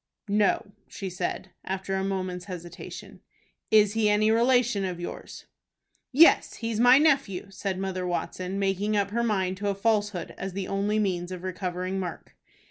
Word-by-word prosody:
"No," 205 0 +1 0.2
she 190 -2 -6
said, 185 +1 -4
after 190 0 -3
a 190 0 0
moment's 185 -2 -3
hesitation. 175 -3 -9 0.5
"Is 210 -2 +5
he 220 -1 +2
any 215 +1 +3
relation 240 -2 +3
of 180 -2 -3
yours?" 175 - -7 0.7
"Yes, 320 +6 +5
he's 230 -1 -3
my 245 +2 +7
nephew," 270 - +2
said 195 -1 -3
Mother 185 -1 -3
Watson, 180 +2 -3
making 200 +2 0
up 200 -1 0
her 235 +2 0
mind 190 -5 0
to 205 +1 -1
a 200 - -1
falsehood 205 -4 0
as 190 -1 -4
the 195 0 -3
only 200 +2 0
means 185 -4 -1
of 180 -1 -6
recovering 185 0 -3
Mark. 180 -3 -6
195 Hz, 160 wpm, -27 LUFS, 185-215 Hz, 0.7 s, my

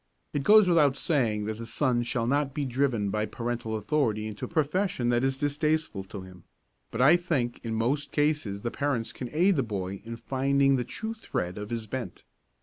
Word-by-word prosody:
It 145 - 0
goes 210 +5 +7
without 150 -6 +4
saying 115 -9 0
that 110 +1 -4
the 115 - -5
son 125 0 +1
shall 120 0 -1
not 140 +2 0
be 145 - -1
driven 125 -6 0
by 105 +1 -1
parental 115 -2 -3
authority 110 -1 0
into 110 -1 -5
a - - -7
profession 160 -4 0
that 120 +1 +2
is 135 0 +1
distasteful 145 -6 0
to 95 0 -8
him; 95 -2 -13 0.5
but 115 - -2
I 155 +6 +8
think 155 -9 -1
in 115 -1 -3
most 130 +6 0
cases 145 -10 0
the 120 - -2
parents 140 -6 -1
can 125 - -6
aid 175 +3 +3
the - - +3
boy 100 -4 -4
in 115 +1 -6
finding 135 +2 +2
the 125 - 0
true 220 - -5
thread 90 - -4
of 105 0 -6
his 115 -2 -3
bent. 115 -4 -6
125 Hz, 200 wpm, -28 LUFS, 110-145 Hz, 0.5 s, I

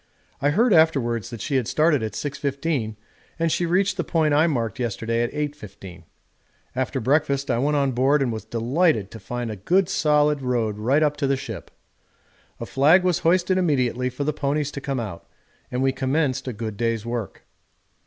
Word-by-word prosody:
I 145 - +3
heard 220 +9 +3
afterwards 135 - +2
that 115 -3 -8
she 140 -2 0
had 125 -4 -1
started 155 -3 +2
at 110 -2 -3
6.15 140 -1 -2 0.4
and 165 -1 0
she 175 - 0
reached 190 +3 +1
the - - 0
point 155 -3 +1
I 155 +3 +4
marked 120 -5 -2
yesterday 115 -1 -1
at 120 - -1
8.15. 105 - -7 0.7
After 130 +1 -1
breakfast 140 +1 +1
I 120 - +1
went 145 +3 +1
on 140 -1 +1
board 135 +3 +2
and 120 -3 -1
was 110 - -5
delighted 115 - 0
to 115 - -9
find 120 -1 -4
a - - -5
good 175 - +1
solid 150 -4 +2
road 115 -5 -1
right 135 +8 +2
up 150 -1 +1
to 145 -2 0
the 135 0 +1
ship. 110 - -7 0.9
A - - -4
flag 155 +7 +4
was 180 -3 +1
hoisted 180 +2 +2
immediately 125 -7 +1
for 125 +3 -4
the 150 +1 0
ponies 145 0 -1
to 140 - -6
come 135 -2 -2
out, 100 -7 -6 0.4
and 125 +1 -1
we 135 - +3
commenced 130 +1 -1
a 125 - -2
good 110 -1 -5
day's 115 -2 -1
work. 115 -4 -5
135 Hz, 190 wpm, -23 LUFS, 115-150 Hz, 0.9 s, I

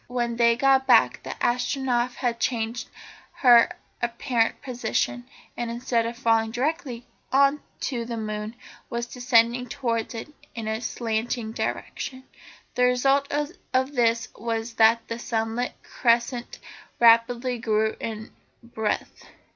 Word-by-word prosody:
When 240 -1 -2
they 235 0 +5
got 265 +1 +3
back 250 - +5
the - - -9
Astronef 245 0 0
had 240 -2 -1
changed 230 -1 -2 0.4
her 240 -3 +6 0.3
apparent 235 0 0
position, 120 - -2 0.3
and, 240 -1 -3
instead 235 -1 0
of 235 0 -6
falling 225 -3 +2
directly 250 0 -2 0.3
on 275 +2 +4 0.2
to 245 -3 -2
the 235 0 -4
moon, 215 +1 -4 0.3
was 235 -1 -2
descending 245 0 +2
towards 230 -2 -2
it 225 - -6 0.3
in 225 -2 -5
a 220 +1 -2
slanting 225 0 -2
direction. 260 +3 -4 0.5
The 250 -1 +3
result 270 +3 +2
of 290 -3 -2
this 230 -3 +2
was 230 0 -3
that 225 +1 +4
the 230 0 -5
sunlit 225 +1 -2
crescent 240 +1 0 0.4
rapidly 235 +1 +4
grew 220 -1 +1
in 220 -1 -6 0.3
breadth. 220 -2 -3
235 Hz, 125 wpm, -25 LUFS, 230-250 Hz, 0.5 s, her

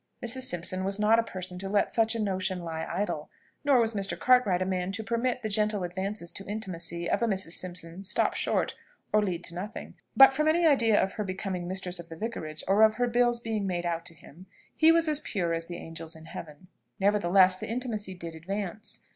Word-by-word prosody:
Mrs. 260 +2 0
Simpson 185 +2 -2
was 195 +1 0
not 215 +2 +4
a - - +2
person 185 -3 -6
to 195 +1 -5
let 205 0 +1
such 225 0 +2
a - - -2
notion 185 -3 -1
lie 160 -1 -4
idle; 185 -6 -2 0.3
nor 280 -3 +5
was 230 -1 +2
Mr. 200 -1 -1
Cartwright 250 -8 +4
a 185 - 0
man 185 0 -1
to 220 +2 -3
permit 240 +2 -1
the - - 0
gentle 210 -1 0
advances 190 0 -4
to 195 - -6
intimacy 170 -5 -4
of - - +1
a 235 - +2
Mrs. 190 -5 -1
Simpson 175 0 -3
stop 195 - +1
short, - - 0 0.4
or 215 - +5
lead 180 -4 -2
to 170 - -5
nothing. 190 +5 -6 0.2
But 270 0 +9
from 305 +3 +1
any 335 +2 +3
idea 235 -8 +5
of 195 - 0
her 210 - -3
becoming 185 -2 -4
mistress 185 -1 -3
of 170 0 -9
the 165 - -8
Vicarage, 160 -8 -5
or 195 +3 +4
of 220 0 +6
her 245 - +1
bills 240 0 +2
being 220 -4 -2
made 175 -2 -2
out 170 -1 -1
to 165 - -8
him, 170 +5 -15 0.3
he 320 +1 +6
was 330 0 +3
as 300 -2 +2
pure 175 - -2
as 165 0 -2
the 175 - -6
angels 165 0 -6
in 160 0 -12
heaven. 160 +1 -10 0.3
Nevertheless, 190 -2 +4
the - - -6
intimacy 220 -5 -3
did 170 -2 -7
advance. 195 +5 -4
195 Hz, 220 wpm, -28 LUFS, 175-225 Hz, 0.4 s, But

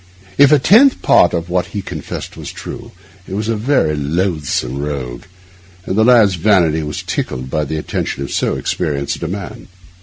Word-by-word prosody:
If 140 0 +7
a 150 - +7
tenth 230 - +5
part 90 - +5
of 85 -1 -3
what 90 0 -1
he 100 - -3
confessed 80 -5 -7
were - - -10
true, - - -8 0.4
he - - -7
was 105 +1 -2
a 115 - +1
very 110 - +1
loathsome 75 -4 -1
rogue; 65 -5 -5 0.6
and 95 - -2
the 110 - +4
lad's 115 -5 +5
vanity 85 -4 +2
was 75 -1 -5
tickled 65 0 -4
by 75 -1 0
the 80 +2 -4
attention 70 -2 -3
of 70 - -6
so - - 0
experienced 70 -5 -2
a 85 - -2
man. 95 +3 -7
85 Hz, 180 wpm, -17 LUFS, 75-105 Hz, 0.6 s, If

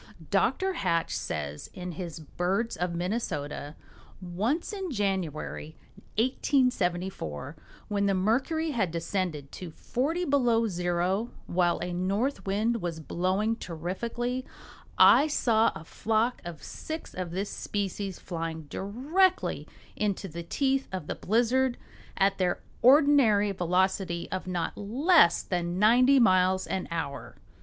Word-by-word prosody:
Dr. 380 0 +2
Hatch 170 - 0
says, 75 -1 -4
in 180 0 -5
his 170 -1 -6
"Birds 185 +8 -1
of 175 -1 -2
Minnesota:" 165 -6 -3 0.4
"Once 210 - -2
in 385 -3 -4
January, 190 - -3 0.4
1874, 190 - 0 0.3
when 200 -1 0
the 195 - +2
mercury 265 - +1
had 220 -9 0
descended 165 -3 -3
to 180 - -7
40 295 - -2
below 245 -6 +3
zero, 180 +4 0 0.2
while 175 -1 +1
a 175 0 -3
north 195 +5 -1
wind 215 +3 0
was 170 -2 -3
blowing 185 +7 0
terrifically, 230 +9 -3 0.5
I 295 - +7
saw 230 -7 +3
a - - -8
flock 225 +7 0
of 170 -2 -8
six 315 0 -7
of 180 -1 -4
this 190 +4 -3
species 200 -2 -3
flying 165 -2 -5
directly 280 - 0 0.3
into 205 -2 -1
the 170 0 -6
teeth 270 - 0
of 185 -5 -4
the - - -3
blizzard 245 +4 +1 0.4
at 195 0 +2
their 180 -1 0 0.2
ordinary 255 -7 +5
velocity 180 -1 0
of 185 0 -4
not 175 -3 -2
less 255 - +4
than 175 -1 -2
ninety 250 +6 +5
miles 185 -4 +4
an 190 - -3
hour." 140 -7 -4
195 Hz, 125 wpm, -28 LUFS, 175-240 Hz, 0.5 s, I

